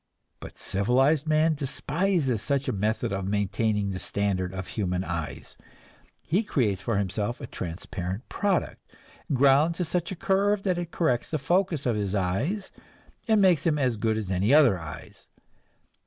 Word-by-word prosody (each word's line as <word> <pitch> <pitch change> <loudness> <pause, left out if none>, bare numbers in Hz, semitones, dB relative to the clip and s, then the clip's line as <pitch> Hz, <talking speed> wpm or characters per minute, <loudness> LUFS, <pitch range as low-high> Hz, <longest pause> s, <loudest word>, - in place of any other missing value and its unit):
But - - -10
civilized 135 +10 +2
man 155 +1 +3
despises 145 - -1
such 140 +3 -1
a - - +1
method 105 +1 -1
of 95 -1 -3
maintaining 105 0 0
the 95 - -4
standard 95 -2 -1
of 95 -1 -6
human 90 -3 -1
eyes; 85 -4 -5 0.7
he 180 +7 +1
creates 110 - 0
for 105 +2 -1
himself 105 +4 -2
a 140 - -6
transparent 90 +2 -5
product, 200 -3 -1 0.5
ground 140 +4 +4
to 180 - -1
such 170 +1 -1
a - - -3
curve 200 +1 +1
that 185 -3 0
it 175 -2 -4
corrects 130 -9 0
the 155 - -1
focus 170 +1 0
of 120 -3 +1
his 100 -1 -1
eyes, 115 - -1 0.6
and 215 -3 +4
makes 175 -6 +4
them 160 -3 +2
as 130 -5 +1
good 110 0 0
as 105 -4 -4
any 95 +5 +1
other 140 - +6
eyes. 75 -2 -10
125 Hz, 160 wpm, -27 LUFS, 100-160 Hz, 0.7 s, other